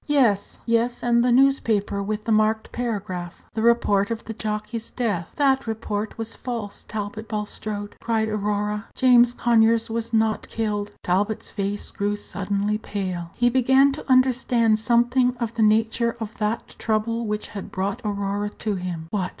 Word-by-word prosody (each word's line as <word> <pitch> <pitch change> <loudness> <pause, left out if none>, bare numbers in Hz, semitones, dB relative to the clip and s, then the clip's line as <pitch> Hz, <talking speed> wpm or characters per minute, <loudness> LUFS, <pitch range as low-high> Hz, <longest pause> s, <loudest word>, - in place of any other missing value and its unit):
"Yes, 240 -9 +2
yes; 235 +1 +1
and 235 0 +3
the 250 - +3
newspaper 230 -6 +3
with 210 +1 -3
the 230 - -2
marked 215 0 +2
paragraph 195 -7 -4
the 220 - -2
report 225 -3 +3
of 230 -1 -3
the 225 - -5
jockey's 215 +1 -4
death." 205 -9 -2
"That 270 -4 +2
report 220 -1 -3
was 225 0 -4
false, 230 -5 -5
Talbot 215 +1 -5
Bulstrode," 210 -1 -4
cried 225 -1 0
Aurora. 210 0 -1
"James 245 -1 +5
Conyers 230 -1 +3
was 230 0 -2
not 220 -1 +1
killed." 210 -2 -2
Talbot's 200 +4 0
face 200 0 -3
grew 205 +1 -1
suddenly 205 +1 -2
pale. 185 -5 -4
He 240 0 +3
began 265 +2 +5
to 275 -1 -5
understand 250 -3 +3
something 240 +2 +3
of 235 -2 -3
the 230 - -2
nature 225 +2 +2
of 220 -1 -6
that 215 +2 -1
trouble 230 +1 0
which 210 0 -2
had 200 -3 -7
brought 195 +5 -2
Aurora 205 0 -2
to 215 - -2
him. 175 -3 -4
"What! 190 -4 -1
220 Hz, 160 wpm, -24 LUFS, 205-235 Hz, -, James